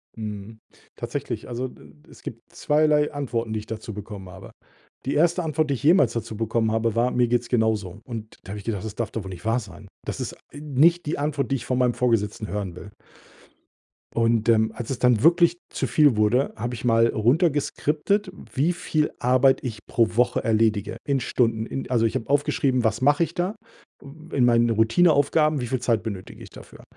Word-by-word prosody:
Mhm. 110 0 -7 0.4
Tatsächlich, - - -5
also, 125 +2 -3
d - - -15
d 75 0 -24
es - - -16
gibt - - -10
zweierlei 150 0 +2
Antworten, 120 -6 -3
die 110 - -1
ich 105 - -10
dazu 110 -1 -7
bekommen 100 -2 -8
habe. 95 +2 -11 0.5
Die 135 - -1
1. 170 +3 +2
Antwort, 155 -1 0
die 140 - +1
ich 135 - -9
jemals 145 - +5
dazu 115 -1 -4
bekommen 110 0 0
habe, 115 0 0
war: 120 +2 +2
„Mir 125 -1 +2
geht's 120 0 0
genauso.“ 110 -5 0
Und 110 -3 -8
da - - -13
habe 105 - -5
ich - - -12
gedacht: 105 -4 -3
„Das 110 -1 -6
darf 115 -2 -3
doch 110 - -4
wohl 95 - -8
nicht 90 0 -9
wahr 115 +3 +2
sein?“ 105 -1 -12 0.2
Das - - -4
ist - - -4 0.2
nicht 150 +4 +2
die 150 - -2
Antwort, 145 -4 -1
die 135 - +3
ich 120 - -5
von 125 - -1
meinem 125 -1 +2
Vorgesetzten 110 -3 0
hören 100 -4 -4
will. 100 +3 -10 1.2
Und, 115 -1 +2
ähm, 110 -1 +3
als 115 0 -7
es 135 - -3
dann 125 -4 +3
wirklich 170 +3 +4
zu - - -2
viel 145 -6 +4
wurde, 110 +6 +2
habe 120 +2 -4
ich 120 +1 -6
mal 115 -1 +4
runtergeskriptet, 150 - +1 0.2
wie 150 +6 +2
viel 155 -3 -1
Arbeit 130 +2 +4
ich 110 -5 -6
pro 115 -2 +1
Woche 125 +1 +2
erledige 110 -2 +1
in 140 -1 0
Stunden. 115 -3 0
In 135 +2 -5
also, 115 -3 +2
ich 110 - -1
habe 115 - -3
aufgeschrieben: 135 -3 +1
Was 110 +1 0
mache 145 +5 +4
ich - - -4
da, 185 +5 -2 0.8
in 130 -3 +3
meinen 120 -1 +4
Routineaufgaben, 145 +6 +3
wie 120 - -3
viel 130 0 -1
Zeit 115 -3 +1
benötige 100 -5 -7
ich - - -10
dafür? - - -14
120 Hz, 205 wpm, -24 LUFS, 110-145 Hz, 1.2 s, jemals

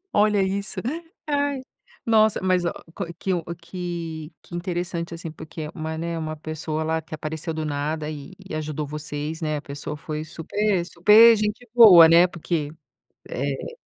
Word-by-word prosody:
Olha 205 -1 +4
isso. 200 +1 -2 0.5
Ai, 285 -2 0 0.4
nossa, 220 -2 +4
mas 185 -2 +2
ó - - +1 0.2
qual 170 - -5
que 190 - -1
um 175 - 0 0.2
que 170 -3 -6
que 175 - -9
interessante, 175 -1 -3
assim, 165 -1 -6
porque 160 +1 -9
é 150 - -4
uma, 160 0 -4
né, 165 0 -3
uma 155 -1 -4
pessoa, 155 0 -4
lá, 160 +1 0
que 160 - -8
apareceu 155 +2 -5
do 160 -1 -3
nada 150 +1 -2
e 150 +4 -9
e 160 - -8
ajudou 155 -1 -3
vocês, 150 +1 -5
né? 155 -1 -1
A 145 - -5
pessoa 145 +1 -6
foi 150 +1 -5
super 175 +3 -1
super 215 +7 +7
gente 210 +3 -2
boa, 195 -9 +10
né, 170 +2 +7
porque, 165 -3 -3 0.6
eh 140 - -4
165 Hz, 170 wpm, -24 LUFS, 155-190 Hz, 0.6 s, boa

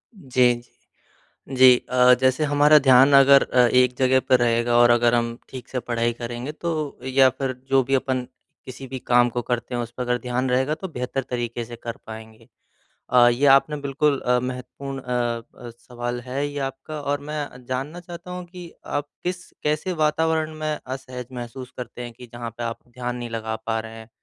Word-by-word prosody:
जी। 125 -7 +2 0.9
जी, 130 -2 +7
अ, 125 0 +6
जैसे 130 +3 +2
हमारा 145 +1 +5
ध्यान 135 +1 +6
अगर 140 0 +7
अ, 125 - -4
एक 125 0 +3
जगह 130 0 +3
पर 130 -1 +5
रहेगा 120 0 +2
और 120 0 +6
अगर 120 0 +3
हम 115 0 -1
ठीक 130 -2 -9
से 130 - -2
पढ़ाई 120 0 -1
करेंगे 120 +4 -6
तो 155 -2 -4
या 130 0 +5
फ़िर 130 +1 -3 0.2
जो 135 0 +4
भी 135 +2 +1
अपन 130 -1 -1 0.4
किसी 130 +1 -9
भी 130 0 -6
काम 120 0 +3
को 120 +1 -3
करते 120 0 -3
हैं, 120 - -1
उस 115 0 -6
पर 125 +1 -5
अगर 125 0 0
ध्यान 125 +1 -1
रहेगा, 130 +4 +1
तो 190 - -6
बेहतर 130 -3 -4
तरीके 120 -1 -3
से 120 0 -9
कर 115 0 -7
पाएँगे। 110 0 -11 0.6
अ, 120 -1 +6
ये 125 +4 +2
आपने 140 +2 +5
बिल्कुल 140 0 0
अ, 125 0 +2
महत्वपूर्ण 130 +2 -6
अ 120 -2 -2 0.2
अ, 120 -1 -9
सवाल 120 +1 -6
है 130 +4 -3
ये 145 0 -6
आपका 140 +3 -8
और 145 0 -2
मैं 150 +1 -5
अ, 125 - -14
जानना 130 +7 -5
चाहता 175 0 -10
हूँ 180 0 -6
कि 175 -1 -11 0.2
आप 145 0 -3
किस 180 +1 -4
कैसे 155 +5 -1
वातावरण 160 0 +1
में 155 0 -2
असहज 130 -1 -7
महसूस 125 +1 -7
करते 125 0 -7
हैं 120 -1 -7
कि 125 +2 -13
जहाँ 120 -1 -6
पे - - -4
आप 115 0 -4
ध्यान 125 0 -5
नहीं 120 -1 -6
लगा 110 -1 -3
पा 110 0 0
रहे 110 0 -9
हैं। 110 0 -12
125 Hz, 200 wpm, -23 LUFS, 120-140 Hz, 0.9 s, जी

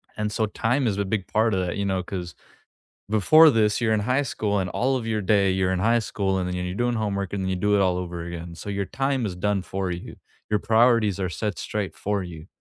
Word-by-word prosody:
And 105 0 -2
so 110 0 0
time 120 +5 0
is 100 -3 0
a 100 - 0
big 95 -1 -2
part 110 0 +2
of 95 - +1
that, 90 - -3
you 100 - -1
know, 95 -1 0
'cause, 90 -2 -6 0.8
before 155 - +6
this 110 -4 +2
you're 115 -2 +2
in 110 - +2
high 130 +7 +1
school, 105 -6 -1
and 90 -1 -3
all 130 +6 0
of 125 - -3
your 110 -1 -1
day 100 -1 +3
you're 95 0 +1
in 95 - -1
high 115 +4 +3
school, 100 -3 -1
and 90 -1 -2
then 90 - -3
you're 90 0 -3
doing 120 +1 0
homework, 100 -4 -2
and 100 -1 -2
then 95 - -2
you 95 - -1
do 105 +3 +1
it 100 - +3
all 90 -2 +2
over 85 -2 -5
again. 85 0 -7
So 100 - -7
your 100 0 -1
time 135 +2 -1
is 95 - -4
done 100 +2 0
for 95 0 -3
you. 90 0 -6 0.3
Your 105 -1 +1
priorities 115 -3 +3
are 95 -2 -1
set 105 +2 -3
straight 105 -2 -3
for 100 -1 -1
you. 80 -3 -9
100 Hz, 255 wpm, -24 LUFS, 95-110 Hz, 0.8 s, before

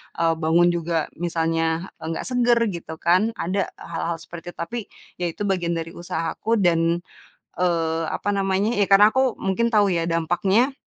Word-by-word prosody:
eee, 165 -1 +2
bangun 165 +2 +4
juga, 165 -2 -1
misalnya 165 0 -1
nggak 160 +1 -4
seger 245 -2 +2
gitu 165 -2 -7
kan, 185 +8 +2
ada 190 +2 -1
hal-hal 170 0 -4
seperti 175 0 -9
itu. - - -52
Tapi, 235 +8 -4 0.4
ya 175 - 0
itu 170 +5 -5
bagian 180 -4 0
dari 165 0 -4
usahaku, 170 +6 -2
dan, 170 0 +2 0.5
eee, 165 -2 0
apa 205 0 -1
namanya, 195 +3 +1
ya 205 - +2
karena 205 +2 +7
aku 260 -2 +2
mungkin 230 +5 0
tahu 205 -4 +3
ya, 165 0 -1
dampaknya, 190 - +2
175 Hz, 160 wpm, -23 LUFS, 165-205 Hz, 0.5 s, karena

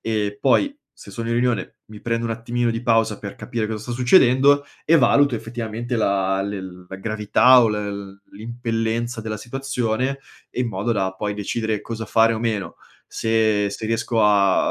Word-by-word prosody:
e 105 -2 -2
poi 280 - +2 0.2
se - - -14
sono 115 -1 -5
in 115 - 0
riunione 120 -1 -1
mi 105 -1 -11
prendo 115 0 -2
un 115 - -3
attimino 115 +1 -1
di 115 0 -3
pausa 115 -3 +2
per 100 -1 -7
capire 115 -3 -3
cosa 110 0 -4
sta 120 - -6
succedendo 130 +2 +4 0.2
e 165 - +6
valuto, 140 -2 +4
effettivamente, 115 +1 -5
la 95 -3 +1
le 100 0 -4 0.3
la 95 - -7
gravità 110 +5 +4
o 115 - +3
l 100 -2 -5
l'impellenza 115 +1 -3
della 110 -1 -4
situazione 130 +1 -2 0.3
e - - -4
in 120 - -2
modo 105 +3 -2
da, 95 -3 -1
poi, 105 +1 -3
decidere 110 +1 -2
cosa 115 -1 -6
fare 115 0 +3
o 110 - -2
meno, 110 -4 -3 0.3
se 110 -2 +1
se 100 +2 -6
riesco 115 0 0
a 100 -2 +3
115 Hz, 175 wpm, -22 LUFS, 105-120 Hz, 0.3 s, e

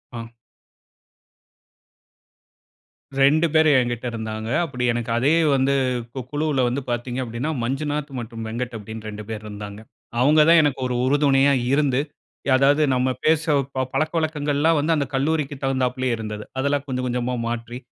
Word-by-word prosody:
ஆ. 115 0 -6 2.9
2 155 +4 +5
பேர் 155 0 +5
எங்கிட்ட 120 0 -3
இருந்தாங்க. 110 -1 -5 0.2
அப்படி 125 -6 -5
எனக்கு 115 -1 -3
அதே 140 +6 +3 0.2
வந்து, 135 +1 +2 0.4
கு 135 - -5
குழுவுல 145 -2 0
வந்து 130 +3 -1
பாத்தீங்க 120 +1 -3
அப்டின்னா, 120 +6 -3
மஞ்சுநாத் 145 +3 -2
மற்றும் 115 -1 -7
வெங்கட் 120 +2 -4
அப்டின்னு 110 +1 -8
2 105 0 -7
பேர் 110 -1 -5
இருந்தாங்க. 105 0 -8 0.4
அவுங்க 150 +4 +5
தான் 170 0 +7
எனக்கு 145 -2 0
ஒரு 125 - -2
உறுதுணையா 140 0 +4 0.2
இருந்து 140 -2 +2 0.5
ய - - +1
அதாவது 140 +3 +4
நம்ம 130 +1 +1 0.2
பேசவ் 155 -2 +3 0.3
பழக்கவழக்கங்கள்லாம் 155 -1 +1
வந்து, 155 +3 +1
அந்த 145 - 0
கல்லூரிக்கு 145 0 0
தகுந்தாப்பிலயே 130 -1 0
இருந்தது. 105 -1 -6
அதெல்லாம் 140 +1 0
கொஞ்சம், 130 -1 -2
கொஞ்சமா 125 0 -1
மாற்றி, 120 +1 -4
130 Hz, 135 wpm, -22 LUFS, 120-145 Hz, 2.9 s, தான்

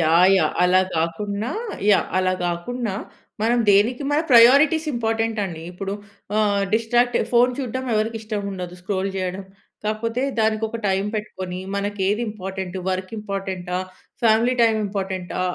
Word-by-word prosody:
Yeah! 165 +3 +5
Yeah! - - +1
అలా 180 +1 +5 0.2
కాకున్నా 200 +7 -2 0.4
yeah! 200 - +4
అలా 185 0 +2
కాకున్నా, 200 +6 -3 0.5
మనం 235 +2 +2
దేనికి 215 +7 +4
మన 295 +1 +3
ప్రయారిటీస్ 280 +7 +6
ఇంపార్టెంట్ 225 -1 -1
అండి. 165 -4 -6
ఇప్పుడు 195 +2 -5 0.4
ఆహ్, 205 -2 +2
డిస్‌ట్రాక్ట్ 240 +2 +2 0.2
ఫోన్ 245 +1 +5
చూడడం 260 -1 -3
ఎవరికి 220 +1 0
ఇష్టం 215 -2 -4
ఉండదు? 180 -2 -6
స్క్రోల్ 190 0 -1
చేయడం. 185 +1 -3 0.4
కాకపోతే 225 +3 -1 0.2
దానికి 220 0 +1
ఒక 230 - -5
టైం 190 0 +1
పెట్టుకొని, 185 -4 -5 0.2
మనకి 205 0 -3
ఏది 210 +4 0
ఇంపార్టెంట్, 190 -2 -6
వర్క్ 185 0 -3
ఇంపార్టెంటా? 190 -3 -4 0.4
Family 230 +2 +4
time 225 -1 +4
ఇంపార్టెంటా? 190 -3 -4
205 Hz, 140 wpm, -22 LUFS, 185-230 Hz, 0.5 s, ప్రయారిటీస్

